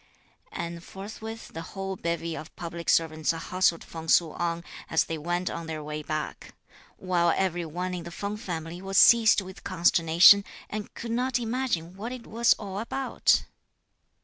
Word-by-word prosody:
And 170 0 -5
forthwith 220 +4 -8
the 165 - -7
whole 195 +3 -5
bevy 170 -1 -3
of 160 - -9
public 170 -2 -5
servants 155 -2 +2
hustled 170 +1 +1
Feng 165 -1 -9
Su 165 -1 +4
on, 170 +1 -2 0.3
as 160 - +3
they 165 - -4
went 175 +3 -2
on 170 -1 -4
their 155 -1 -5
way 150 0 -5
back; 155 0 -5 0.4
while 175 -2 +2
every 175 -3 0
one 180 +3 -3
in 175 -2 -4
the 170 - -7
Feng 200 +4 -4
family 175 -5 -5
was 195 0 -2
seized 230 -3 +7
with 190 0 -11
consternation, 175 +1 +6 0.3
and 210 0 -5
could 235 - -5
not 250 +2 +1
imagine 230 -8 -2
what 220 +5 -5
it 255 -2 -7
was 230 +2 +3
all 195 -2 -6
about. 265 +4 +1
175 Hz, 165 wpm, -27 LUFS, 165-205 Hz, 0.4 s, seized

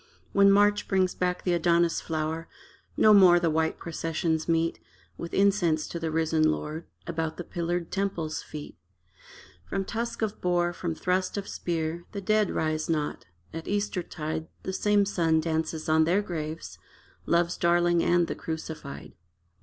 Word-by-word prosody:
When 200 0 +5
March 205 +1 +4
brings 185 -2 +2
back 180 0 -1
the 180 - +1
Adonis 170 0 +2
flower 160 +1 -3 0.5
No 215 - +7
more 185 -4 +7
the 170 -2 +1
white 160 +1 0
processions 165 0 -2
meet, 165 0 +1 0.4
With 170 - -7
incense 190 -6 +2
to 170 - -4
the 165 -1 -2
risen 160 0 +2
lord, 155 +1 -3 0.2
About 160 -2 -3
the 175 - -4
pillared 170 0 -3
temple's 185 -6 -2
feet. 150 -1 -9 0.9
From 195 - -3
tusk 230 +1 -3
of 215 -1 -3
boar, 175 -1 +1
from 170 -2 -3
thrust 185 +3 -1
of 200 - -4
spear 170 0 -3
The 200 - -4
dead 215 +1 +2
rise 155 0 -1
not. 150 - -2 0.3
At 165 0 -6
Eastertide 175 -6 -3 0.2
The 190 - -3
same 205 +1 +3
sun 165 -5 +2
dances 160 0 -2
on 160 0 +4
their 185 +5 +2
graves 160 -3 -5 0.5
Love's 170 +1 +2
darling 175 0 +3
and 175 0 +3
the - - -3
Crucified. 160 -3 -7
170 Hz, 155 wpm, -27 LUFS, 160-185 Hz, 0.9 s, No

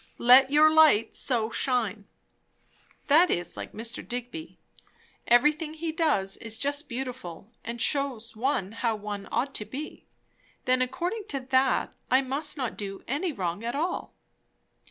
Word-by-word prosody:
"Let 255 +2 +7
your 305 +2 +5
light 310 -9 +5
so 230 -4 0
shine" 225 -7 -1 1.0
That 325 +5 +5
is 175 0 -2
like - - -7
Mr. 230 +3 -4
Digby. 250 +7 -6 0.7
Everything 300 +6 +3
he 325 0 -3
does 300 - +1
is 225 -1 -8
just 285 +3 -2
beautiful, 240 -7 -6
and 235 +1 -6
shews 250 -4 -1
one 225 -4 -1
how 230 0 -1
one 205 -1 -6
ought 275 +1 -1
to 210 - -3
be. 290 +7 -8 0.6
Then 255 0 +3
according 350 - -2
to 275 - -2
that, 260 0 +1 0.2
I 260 +2 +4
must 290 +4 -2
not 255 -4 -3
do 195 -1 -6
any 310 +8 -1
wrong 185 - -3
at 235 +2 -3
all! 335 +5 -3
255 Hz, 145 wpm, -27 LUFS, 225-295 Hz, 1.0 s, Let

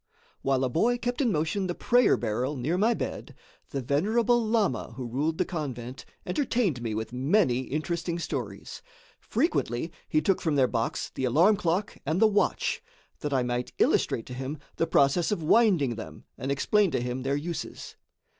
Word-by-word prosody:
While 135 -1 +1
a - - +2
boy 230 - +2
kept 245 +2 -2
in 245 -5 +2
motion 165 +4 0
the 175 - -3
prayer 245 0 +4
barrel 120 +5 -1
near 140 +8 -1
my 220 +5 +3
bed, - - -5 0.3
the 135 -2 -3
venerable 220 - +2
lama 220 - 0
who 130 0 -5
ruled 145 +7 -1
the 185 - +1
convent 130 -7 -5 0.2
entertained 195 - 0
me 115 -2 -3
with 110 +2 -4
many 130 - +2
interesting 170 +3 -2
stories. 170 - -5 0.4
Frequently 170 - -1 0.2
he 155 - +3
took 185 +5 +1
from 160 -3 0
their 135 -2 +5
box 115 -2 -2
the 130 - -2
alarm 165 - +5
clock 190 +1 -1
and 155 +5 0
the 220 - +6
watch, 210 -1 +1 0.4
that 150 - -3
I 130 -2 +2
might 125 0 -2
illustrate 115 - +2
to 125 - -8
him 135 +4 -4 0.2
the 165 - +1
process 140 +7 +3
of 175 -6 -1
winding 175 - +4
them 110 0 -9
and 135 - -3
explain 200 +8 +2
to - - -1
him 125 +1 -3
their 135 +2 0
uses. 165 +3 -6
155 Hz, 175 wpm, -27 LUFS, 130-200 Hz, 0.4 s, the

